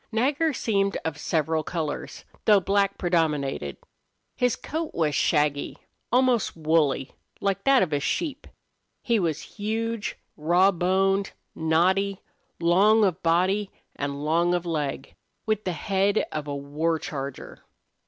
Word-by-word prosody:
Nagger 280 +8 +1
seemed 200 -6 0
of 155 -2 -3
several 160 0 0
colors, 155 -2 -4 0.2
though 210 -2 +6
black 200 +1 +1
predominated. 150 - 0 0.6
His 250 -1 +1
coat 320 +1 -5
was 155 -3 +1
shaggy, 145 0 +1 0.3
almost 250 -6 +2
woolly, 155 -4 +1 0.3
like 195 0 -1
that 275 -4 +5
of 165 -5 -2
a 145 - +2
sheep. 290 - -2 0.6
He 235 -3 +2
was 160 -4 -1 0.2
huge, 225 +1 -2 0.2
raw 175 +5 +4
boned, 195 +2 +1 0.2
knotty, 185 +5 +1 0.4
long 200 +6 +5
of 185 -2 -1
body 185 +5 +2 0.3
and 140 +1 -4
long 170 +3 +2
of 175 0 -2
leg, 150 -5 -3 0.3
with 215 -1 -1
the 180 - -1
head 195 +5 +1
of 150 -1 -4
a 145 - -3
war 150 +4 -1
charger. 140 -6 -7
175 Hz, 130 wpm, -25 LUFS, 155-205 Hz, 0.6 s, though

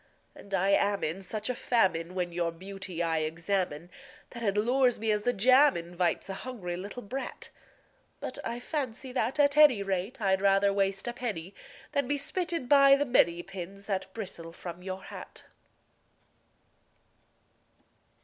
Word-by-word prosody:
And 200 - -14
I 195 +1 +2
am 200 0 +2
in 165 +5 -2
such 210 +3 -4
a 250 - 0
famine 185 -8 +1
when 180 -1 -1
your 170 -1 -1
beauty 190 0 -5
I 165 -1 +1
examine 170 +1 -2 0.4
That 235 - -8
it 205 -3 0
lures 245 +3 +3
me 220 0 0
as 210 0 +1
the 245 - +2
jam 255 +5 +5
invites 170 +2 -1
a 195 - -4
hungry 205 -9 -5
little 200 +7 -7
brat; 260 +7 -6 0.7
But - - -6
I 235 +1 -3
fancy 260 -2 -4
that, 250 +2 -1
at 285 0 +4
any 280 -9 +7
rate, 195 +6 -2
I'd 190 -2 +2
rather 200 0 +4
waste 195 +1 0
a 240 - -2
penny 205 -7 -4 0.4
Than 280 -3 0
be 290 +2 +1
spitted 335 -1 -2
by 275 0 +7
the 285 +1 0
many 175 -9 +3
pins 195 +1 -8
that 190 -2 -3
bristle 175 -6 -6
from 175 +1 -8
your 190 +1 -6
hat. - - -10
200 Hz, 160 wpm, -29 LUFS, 180-245 Hz, 0.7 s, any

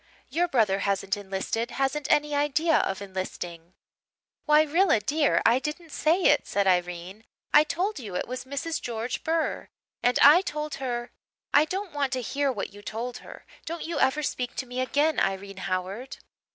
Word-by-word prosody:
Your 350 +2 +1
brother 215 - +2
hasn't 200 0 0
enlisted 205 +4 -3
hasn't 275 +3 -1
any 295 0 +3
idea 295 +3 +2
of 195 +1 -1
enlisting.' 180 -3 -6 0.7
"'Why 300 0 +6
Rilla, 320 - +3
dear, 290 +8 +1
I 235 +3 +5
didn't 310 +3 -6
say 335 +6 +2
it,' - - +4
said 200 -1 +1
Irene. 180 +2 -1 0.3
'I 300 - +8
told 370 +5 -2
you 205 -7 -7
it - - -2
was 255 +1 -5
Mrs. 280 +4 -3
George 235 0 -4
Burr. 325 0 -1 0.3
And 245 0 +2
I 300 +6 +9
told 300 -4 -4
her 240 -2 -3 0.2
' - - -49
"'I 295 +2 +6
don't 375 +1 -4
want 280 -3 -1
to 255 - -1
hear 280 +3 0
what 240 - -5
you 205 - -12
told 235 +4 -5
her. - - -12 0.2
Don't 335 +1 -4
you 330 -2 -3
ever 300 +3 +2
speak 250 -3 -3
to 260 - -3
me 250 0 -5
again, 290 +4 +1
Irene 195 0 -2
Howard.' 190 +8 -3
260 Hz, 180 wpm, -27 LUFS, 200-300 Hz, 0.7 s, I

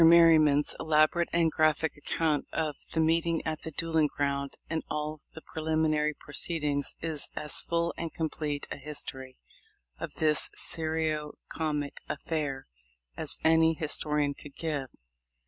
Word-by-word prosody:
Merryman's 160 -3 +6
elaborate 155 +2 +3
and 165 -1 +2
graphic 155 0 +1
account 150 0 -1
of 155 -3 -2 0.2
the 160 - 0
meeting 165 +1 +1
at 155 -1 -3
the - - -4
duelling 160 0 +1
ground 140 -1 -2
and 160 -1 -2
all 150 0 -3 0.2
the 160 - -10
pre 160 - -7
liminary 155 -1 +1
proceedings 145 -2 +1
is 160 -3 -1
as 150 - +2
full 170 0 -1
and 165 -1 -4
complete 150 -2 -3
a - - -3
his 150 +1 -4
tory 130 -1 -9 0.6
of - - -6
this 155 -1 +4
serio 155 -2 0 0.2
comic 150 -3 -3
affair 145 -5 -3 0.5
as - - +1
any 160 0 +5
historian 150 -2 0
could 140 0 -13
give. 150 -5 -3
155 Hz, 140 wpm, -29 LUFS, 150-160 Hz, 0.6 s, Merryman's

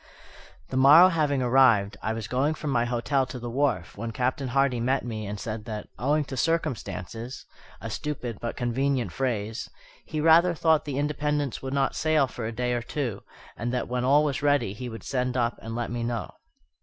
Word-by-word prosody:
The 130 - -2
morrow 150 +7 +8
having 150 -6 +1
arrived, 120 -5 +4
I 110 - -1
was 110 -3 -5
going 140 +7 +1
from 150 -2 -4
my 120 -2 +2
hotel 125 +3 0
to 130 - -7
the 120 -1 -6
wharf, 125 - 0
when 115 +2 -4
Captain 130 +3 -1
Hardy 135 -1 +1
met 130 +3 0
me 110 -3 -4
and 105 0 -5
said 110 0 -5
that, 105 -2 -6
"owing 145 +5 +2
to 135 - -6
circumstances" 125 - -3 0.4
(a 115 - -5
stupid 125 -6 -4
but 120 - -4
convenient 125 +1 0
phrase), 115 -4 -2 0.4
"he 155 - -3
rather 165 +3 +5
thought 160 -1 +3
the 140 -3 -3
Independence 145 -2 -1
would 135 +1 -4
not 135 -1 +1
sail 155 -3 +3
for 125 -3 -6
a - - -3
day 125 +1 -1
or 120 - -1
two, 120 -4 -3 0.3
and 120 +1 -3
that 125 - -1
when 125 0 -2
all 140 +4 +5
was 145 -1 -1
ready 145 -8 +2
he 125 +4 -6
would 115 -1 -9
send 125 -1 -1
up 120 -1 0
and 115 0 -6
let 120 0 -3
me 120 -1 -3
know." 115 -5 -3
125 Hz, 200 wpm, -26 LUFS, 115-145 Hz, 0.4 s, morrow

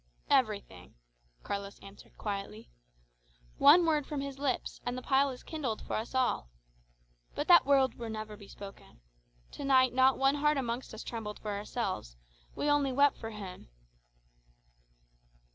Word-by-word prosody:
"Everything," 215 - 0 0.5
Carlos 200 0 -5
answered 195 0 -15
quietly. 195 - -5 0.9
"One 320 +5 +8
word 305 -3 +1
from 295 -2 -3
his 275 -1 -5
lips, 275 -3 -2
and 245 +1 -3
the 255 - -6
pile 275 +1 +3
is 255 -2 -8
kindled 270 -9 -4
for - - -3
us 225 +4 -4
all. 250 - +1 0.9
But 290 - -2
that 345 -5 +8
word 270 -3 +4
will 230 -1 -5
never 215 -1 -6
be 205 -1 -14
spoken. 195 - -12 0.5
To - - -8
night 260 -2 +4
not 260 +1 +4
one 270 +1 +3
heart 300 0 +3
amongst 240 -2 -3
us 220 - -7
trembled 220 -3 -5
for 210 - -5
ourselves, 200 - -4 0.4
we - - -2
only 290 -2 +3
wept 280 +2 +4
for 225 - -6
him." 195 - -9
250 Hz, 150 wpm, -31 LUFS, 210-275 Hz, 0.9 s, One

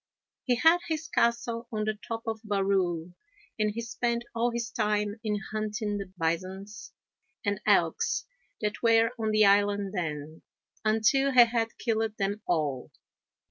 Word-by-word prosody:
He 250 - +3
had 325 +8 +5
his 320 -1 -2
castle 235 -3 0
on 215 -1 -1
the 215 0 0
top 225 +2 -6
of 220 -1 -3
Barrule, 190 -5 0 0.5
and 215 0 +2
he 220 +3 -4
spent 235 0 -2
all 235 +1 +1
his 235 0 -3
time 210 -1 0
in 210 -2 0
hunting 215 -1 -2
the 195 -2 -7
bisons 190 +4 -3 0.5
and 205 0 -1
elks - - +2 0.4
that 210 0 -2
were 230 0 +4
on 220 -1 0
the 215 0 +5
island 200 0 +3
then, 155 -4 -4 0.4
until 225 +6 +3
he 245 -2 +9
had 230 -1 -2
killed 220 -2 -1
them 200 +2 -1
all. 150 -7 -1
215 Hz, 145 wpm, -28 LUFS, 200-230 Hz, 0.5 s, he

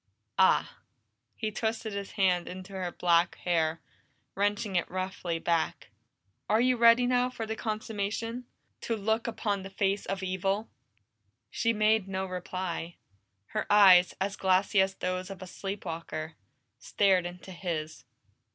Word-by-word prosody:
"Ah!" - - +3 0.6
He 215 - -3
twisted 220 0 -2
his 200 -1 -5
hand 180 -3 +2
in 185 +1 -7
her 190 -2 -4
black 170 0 +2
hair, 165 -2 0 0.5
wrenching 205 0 -1
it 175 - +1
roughly 185 -2 -3
back. 165 0 -1 0.6
"Are 215 +2 +4
you 250 +1 +3
ready 235 +1 +6
now 250 0 +2
for 230 -3 -5
the 220 0 -3
consummation? 220 +2 -3 0.4
To 230 - -1
look 220 +2 0
upon 205 -3 -1
the 190 - -8
face 195 +1 -1
of 195 0 -3
evil?" 195 +3 -1 0.8
She 230 - +1
made 215 -2 +2
no 190 0 -2
reply. 180 -2 -4 0.5
Her - - -3
eyes, 190 -3 +7
as 195 +1 -1
glassy 190 +1 +3
as 190 0 0
those 185 +1 -3
of 195 -2 -8
a 185 - -7
sleep 195 +2 -6
walker, 160 -1 -5 0.5
stared 190 -3 +2
into 180 +2 -10
his. 165 -4 -4
195 Hz, 140 wpm, -29 LUFS, 180-215 Hz, 0.8 s, eyes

